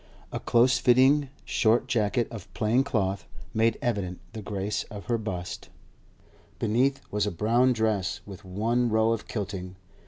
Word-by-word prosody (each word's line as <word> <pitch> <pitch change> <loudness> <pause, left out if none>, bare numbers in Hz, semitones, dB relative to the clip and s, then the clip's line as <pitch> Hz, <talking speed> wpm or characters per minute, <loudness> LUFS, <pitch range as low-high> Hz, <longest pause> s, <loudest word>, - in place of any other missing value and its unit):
A - - -3
close 120 +2 +3
fitting, 130 +3 +4 0.2
short 115 +2 +2
jacket 115 -2 +1
of 110 -6 -9
plain 115 +5 +2
cloth 100 -8 -1 0.3
made 110 0 +2
evident 100 -7 -1
the 110 - -6
grace 100 0 -2
of 105 -1 -9
her 120 -2 0
bust; 90 -5 -5 0.9
beneath 130 +5 +1
was 105 0 0
a - - -1
brown 115 +8 +3
dress 105 -6 0
with 100 0 -10
one 115 +6 0
row 110 +1 +3
of 115 -2 -2
kilting. 95 -3 -5
110 Hz, 150 wpm, -27 LUFS, 100-120 Hz, 0.9 s, fitting